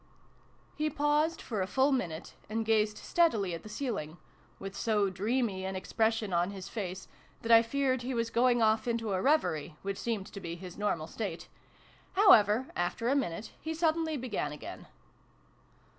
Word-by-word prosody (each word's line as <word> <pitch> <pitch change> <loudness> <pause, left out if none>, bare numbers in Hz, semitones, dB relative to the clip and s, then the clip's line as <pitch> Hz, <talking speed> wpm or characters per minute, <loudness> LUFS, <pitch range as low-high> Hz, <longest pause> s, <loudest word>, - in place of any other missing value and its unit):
He 305 0 0
paused 295 +3 +1
for 215 -5 -2
a 185 - -1
full 265 +6 +3
minute, 175 -11 -2 0.2
and 225 +1 -1
gazed 215 -1 +2
steadily 225 - +2
at 165 - -5
the 215 - -11
ceiling 210 - -4 0.4
with 195 0 -7
so 205 -2 +1
dreamy 205 0 -1
an 190 0 -3
expression 220 +1 0
on 175 +2 +2
his 195 -1 -7
face, 190 -3 -5 0.4
that 230 - 0
I 230 0 +9
feared 260 +2 0
he 250 +1 -3
was 230 -1 -1
going 240 -1 +3
off 220 +1 +2
into 230 -3 -1
a 185 - 0
reverie, 175 - +1
which 195 0 -3
seemed 220 -5 -2
to 200 - -6
be 170 -3 -5
his 180 0 -9
normal 200 -6 -1
state. 185 -1 -5 0.6
However, 260 - +6
after 175 +7 -1
a 275 - +3
minute, 225 -7 -2
he 320 0 -3
suddenly 320 -1 +1
began 225 - -3
again. 150 - -9
220 Hz, 170 wpm, -31 LUFS, 190-255 Hz, 0.6 s, I